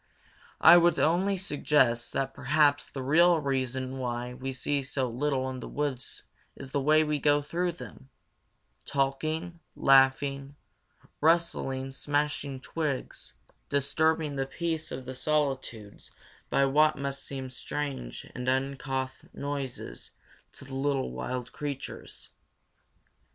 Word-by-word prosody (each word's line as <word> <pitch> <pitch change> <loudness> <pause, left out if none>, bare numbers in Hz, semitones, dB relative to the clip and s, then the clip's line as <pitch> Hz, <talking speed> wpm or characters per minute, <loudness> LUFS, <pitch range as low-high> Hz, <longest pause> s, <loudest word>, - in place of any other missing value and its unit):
I 170 +2 +10
would 170 -2 +4
only 185 +5 +2
suggest 140 -9 +2
that 135 0 -1
perhaps 145 +1 +2
the 135 - -6
real 170 +5 +5
reason 130 -2 -2
why 125 0 -3
we 135 +2 -5
see 140 +2 -1
so 135 -1 -1
little 130 +2 -1
in 130 - -6
the - - -7
woods 145 -4 -3 0.3
is 130 - -9
the 140 - 0
way 155 +3 +5
we 150 -1 0
go 145 +1 +3
through 175 +4 -1
them 135 -5 -11 0.7
talking, 155 +5 -1 0.2
laughing, 135 +1 +3 0.7
rustling, 150 -5 +1
smashing 145 -1 -2
twigs, 150 -3 -4 0.4
disturbing 150 +1 +1
the 135 0 -1
peace 165 +1 -2
of 130 0 -6
the 130 - -5
solitudes 130 -7 -2 0.4
by 140 - +3
what 155 +3 +4
must 140 0 -3
seem 130 -2 -5
strange 130 - -5
and 125 +1 -2
uncouth 130 0 -2
noises 140 -3 -5 0.4
to - - -10
the 135 - -10
little 135 - 0
wild 125 - -4
creatures. 145 -2 -6
140 Hz, 125 wpm, -29 LUFS, 130-150 Hz, 0.7 s, I